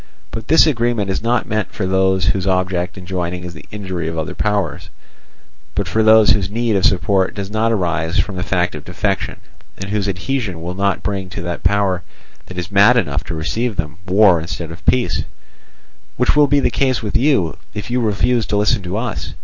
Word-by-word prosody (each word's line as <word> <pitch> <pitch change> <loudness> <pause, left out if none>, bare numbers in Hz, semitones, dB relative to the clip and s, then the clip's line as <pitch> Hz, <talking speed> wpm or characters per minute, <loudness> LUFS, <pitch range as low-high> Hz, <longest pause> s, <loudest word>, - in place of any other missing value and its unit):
But 115 0 -6
this 160 +3 +6
agreement 120 -8 0
is - - -2
not 120 +2 +1
meant 110 -1 -2
for 100 - -2
those 95 -1 +2
whose 95 -1 0
object 90 -1 0
in 90 - -9
joining 90 -1 -3
is 90 -1 -7
the 80 - -12
injury 95 -5 -4
of 80 0 -4
other 80 +3 -3
powers, 105 +1 -1 0.9
but 100 - -1
for 110 +6 +1
those 110 0 +6
whose 100 -2 +2
need 115 0 0
of 95 -1 +2
support 95 +1 +2
does 100 0 -5
not 110 +1 +1
arise 85 -5 0
from 100 - 0
the 90 - -3
fact 90 -2 0
of 75 -2 -7
defection, 95 +3 -2 0.4
and 95 +1 -6
whose 105 -1 0
adhesion 100 0 -2
will 85 +2 -5
not 100 +1 0
bring 95 -2 -3
to 90 - -6
the 85 0 -3
power 100 -3 +2 0.5
that 95 - -10
is 90 +2 -4
mad 100 +5 +6
enough 75 -9 0
to 85 - -4
receive 110 +9 -2
them 75 -2 -4
war 95 -2 +5
instead 85 0 -5
of 85 - -11
peace; 120 -9 +2 0.9
which 125 - +2
will 145 -1 +5
be 145 0 +3
the - - +1
case 130 -4 0
with 105 - -3
you, 115 - +2 0.2
if 105 +2 -5
you 125 0 +1
refuse 115 +2 +1
to 105 - 0
listen 105 0 +2
to 90 +2 -4
us. 110 - -4
95 Hz, 205 wpm, -18 LUFS, 90-110 Hz, 0.9 s, this